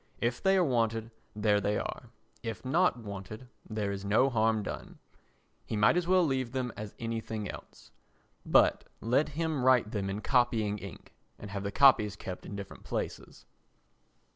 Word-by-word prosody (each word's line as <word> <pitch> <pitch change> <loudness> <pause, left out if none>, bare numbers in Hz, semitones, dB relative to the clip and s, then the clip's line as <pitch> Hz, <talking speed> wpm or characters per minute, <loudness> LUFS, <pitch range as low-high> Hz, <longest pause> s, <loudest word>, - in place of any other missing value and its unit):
If 120 +1 -1
they 195 0 +4
are 185 - +4
wanted, 115 -5 0 0.2
there 105 -1 +2
they 105 +1 0
are; - - -5 0.3
if 115 +2 -6
not 170 +4 +3
wanted, 105 +2 -8 0.2
there 105 -2 -2
is 100 0 -5
no 110 +7 +3
harm 110 -2 +2
done. - - -7 0.7
He - - -4
might 105 +9 +5
as 175 -1 0
well 185 -1 +4
leave 130 -4 -1
them 125 -2 -2
as 105 -1 -7
anything 115 -2 -4
else. - - -11 0.5
But - - +4
let 125 +7 +1
him 160 -5 -1
write 125 -4 +4
them 100 -2 -2
in 100 +2 -3
copying 115 -5 +1
ink 100 -2 -11 0.2
and 105 - -9
have 100 -1 -3
the 100 0 -3
copies 110 -7 +5
kept 90 -1 -7
in 100 - -6
different 100 -1 -8
places. - - -5
115 Hz, 165 wpm, -30 LUFS, 105-130 Hz, 0.7 s, might